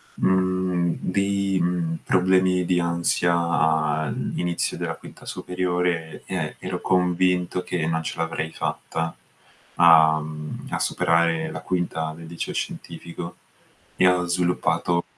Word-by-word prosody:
mhmm, 95 -2 +1
dei, 100 0 0
mhmm, 85 -1 0
problemi 95 0 +3
di 90 0 +2
ansia 85 -3 +1 0.2
inizio 90 -1 -1
della - - -3
quinta - - -14
superiore 90 -3 -2
e - - -3
ero - - -4
convinto 90 0 +1
che 85 -3 -2
non 80 0 0
ce - - -5
l'avrei 80 -1 -2
fatta 80 0 -3 0.6
a 80 -2 +7
mhmm, 75 0 -7
a - - -2
superare 85 -2 +1
la 80 - -5
quinta 80 -3 -2
del 85 0 -10
liceo 85 +1 -5
scientifico 85 +1 -6 0.6
e 90 - +5
ho 90 -1 +3
sviluppato 85 -1 +1
85 Hz, 120 wpm, -24 LUFS, 80-90 Hz, 0.6 s, a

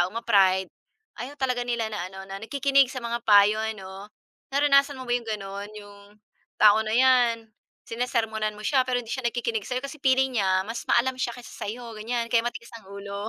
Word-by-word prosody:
taong 185 +6 -1
ma-pride 190 -4 +3 0.5
ayaw 265 +4 -6
talaga 255 -2 -1
nila 235 -2 -1
na 185 -3 -4
ano 190 0 -10
na 195 +1 -8
nakikinig 275 +2 +2
sa 255 -2 -7
mga 235 0 -2
payo 210 +1 +6 0.2
'no. 195 +1 -10 0.5
Naranasan 280 0 +4
mo 255 - -6
ba - - 0
'yong 235 -2 -3
gano'n? 200 -1 -5
'Yong 205 -1 -12 0.6
tao 215 0 +7
na 215 0 -2
'yan 245 -3 +3 0.3
sinesermonan 220 -3 -2
mo 210 - -11
siya 270 +1 +3
pero 250 -1 0
hindi 230 - -11
siya 260 -3 -4
nagkikinig 230 -3 -3
sa'yo, 255 0 -2
kasi 275 +2 -7
feeling 265 -2 +2
niya 190 -1 +1
mas 230 +3 -5
maalam 255 +2 +2
siya 240 0 -2
kaysa 245 - -12
sa - - -4
'yo 235 +1 -6
ganyan 230 +2 -2
kaya 230 - +5
matigas 235 0 -6
ang 190 - -20
ulo. 200 +1 -6
230 Hz, 200 wpm, -25 LUFS, 205-250 Hz, 0.6 s, tao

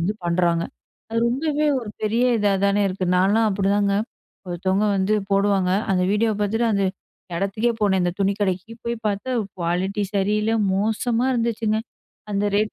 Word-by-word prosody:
வந்து 185 +6 0
பண்றாங்க. 170 -1 +1 0.5
அது 230 - 0
ரொம்பவே, 295 +5 0 0.2
ஒரு 220 - -7
பெரிய 225 +3 +1
இதா 205 -2 +2
தானே 200 +1 +3
இருக்கு. 185 0 -3
நான்லாம் 205 +5 +3
அப்டிதாங்க, 200 0 +1 0.5
ஒருத்தவங்க 190 +3 0
வந்து 190 +3 +1 0.2
போடுவாங்க, 195 -2 +2 0.2
அந்த 185 -1 +2
வீடியோ 220 +1 +2
பார்த்துட்டு, 220 +3 +1
அந்த 200 -1 +1 0.5
எடத்துக்கே 205 +6 0
போனேன், 190 -2 +2
அந்த 175 -1 0
துணி 195 +1 +3
கடைக்கு 190 +2 -1
போய் 235 0 -2
பார்த்தா 210 +5 -2 0.3
குவாலிட்டி 180 +4 -1
சரியில்ல, 210 +2 +1 0.2
மோசமா 225 +4 0
இருந்துச்சுங்க. 230 -2 0 0.5
அந்த 200 0 0
ரேட் 215 +1 +1
205 Hz, 145 wpm, -22 LUFS, 190-220 Hz, 0.5 s, தானே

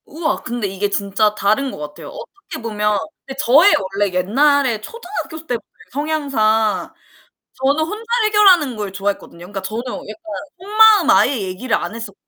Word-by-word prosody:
우와 315 +1 -2
근데 240 -4 -3
이게 195 +1 -2
진짜 200 +1 +1
다른 215 +7 +1
것 - - -9
같아요. 150 0 -8
어떻게 395 - -10
보면 210 -2 0 0.4
저의 310 +8 +6
원래 195 +1 -1
옛날에 245 +5 +2
초등학교 350 - -7
때 245 - 0
보면 - - -22 0.6
성향상 220 -3 +1 0.6
저는 280 +4 +1
혼자 420 +7 -6 0.2
해결하는 380 - +4
걸 205 -2 -4
좋아했거든요. 195 -3 -4
그러니까 190 +3 -7
저는 215 +5 -4
약간 315 +7 -7 0.3
속마음 420 -3 +5
아예 285 - +5
얘기를 190 +6 -3
안 - - -4
했었 225 -4 -7
235 Hz, 340 characters per minute, -19 LUFS, 205-315 Hz, 0.6 s, 저의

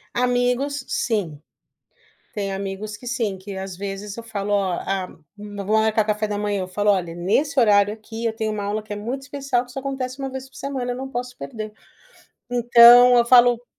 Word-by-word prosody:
Amigos, 250 +3 0
sim. 180 -11 -2 0.9
Tem 200 -2 -3
amigos 200 +2 -5
que 245 - -14
sim, 225 -6 -2
que 195 0 -8
às 190 -2 -6
vezes 200 +1 -6
eu 230 - -7
falo: 205 -2 -4
"Ó, 195 -2 +1
a 190 -1 -2 0.3
vamos 205 -1 -7
marcar 220 0 +2
café 210 0 -1
da 205 -1 -3
manhã", 205 -1 -1
eu 185 - -6
falo: 205 +2 +1
"Olhe, 175 -4 0
nesse 270 - 0
horário 205 -3 +4
aqui 225 +1 -8
eu 225 - 0
tenho 220 -1 -2
uma 205 -1 -4
aula 210 +1 -2
que 210 - -9
é - - -4
muito 245 +6 -4
especial 275 -3 -2
que 245 - -17
só 270 - -6
acontece 265 -1 -4
uma 270 0 -3
vez 265 0 -7
por - - -18
semana, 260 -3 -3
não 265 +2 -5
posso 250 -1 -5
perder". 215 -4 -7 0.8
Então, 245 +1 +7
eu 235 - +4
falo 245 -1 +5
220 Hz, 195 wpm, -22 LUFS, 205-245 Hz, 0.9 s, Então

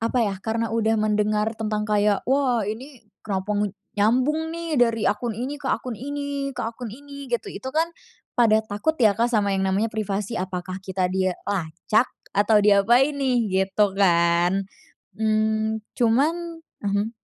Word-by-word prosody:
apa 230 +3 0
ya, 200 - -1
karena 225 +2 -2
udah 225 0 +2
mendengar 210 0 +1
tentang 215 -1 -2
kayak, 210 -1 +1
"Wah 260 -5 +2
ini, 235 +4 -7 0.2
kenapa 195 0 -2 0.4
nyambung 260 +10 +2
nih, 335 -2 -3
dari 230 -3 +2
akun 230 +3 -1
ini 260 +5 -3
ke 270 - -4
akun 245 -4 -2
ini, 285 0 -3
ke - - -2
akun 230 +1 -5
ini?" 280 +1 -10
gitu. 240 -1 -2
Itu 260 - -6
kan 320 +2 +2 0.5
pada 220 -2 +5
takut 220 +10 -1
ya 215 -3 +6
Kak 235 +2 +2
sama 205 -3 +2
yang 190 - 0
namanya 200 +4 +1
privasi. 210 0 -2
Apakah 185 0 -4
kita 185 -1 -1
dilacak? 185 +2 0 0.3
Atau 210 +1 +4
diapain 240 +8 +4
nih? 250 -7 +1
Gitu 205 +2 +2
kan. 175 0 +3 0.5
Mmm, 220 0 +1 0.2
cuman 325 +8 +1 0.2
mhm. 200 +1 0
220 Hz, 150 wpm, -24 LUFS, 205-255 Hz, 0.5 s, ya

